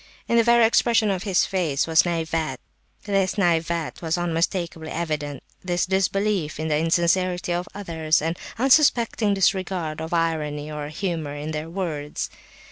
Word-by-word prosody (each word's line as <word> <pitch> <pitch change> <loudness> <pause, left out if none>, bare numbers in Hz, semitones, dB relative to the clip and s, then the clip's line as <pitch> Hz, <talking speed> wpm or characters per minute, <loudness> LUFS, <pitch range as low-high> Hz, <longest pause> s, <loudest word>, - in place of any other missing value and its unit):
In 235 - +1
the 230 - +6
very 235 0 +5
expression 225 -2 +3
of 185 -2 -2
his 195 -3 +2
face 165 -8 0
this 160 +1 +4 1.3
naivete 170 -3 0
was 165 +1 -1
unmistakably 170 -1 -2
evident, 150 -4 -3 0.2
this 180 -1 0
disbelief 190 -3 0
in 160 0 -2
the 150 - +2
insincerity 175 +2 +1
of 175 +1 -2
others, 160 -5 0
and 165 +2 -2 0.2
unsuspecting 240 -5 +3
disregard 185 -5 0
of 160 - -5
irony 155 -3 -1
or 150 -1 -5
humour 155 -2 -3
in 150 +2 -5
their 155 +1 -4
words. 160 -5 -4
170 Hz, 135 wpm, -24 LUFS, 155-190 Hz, 1.3 s, the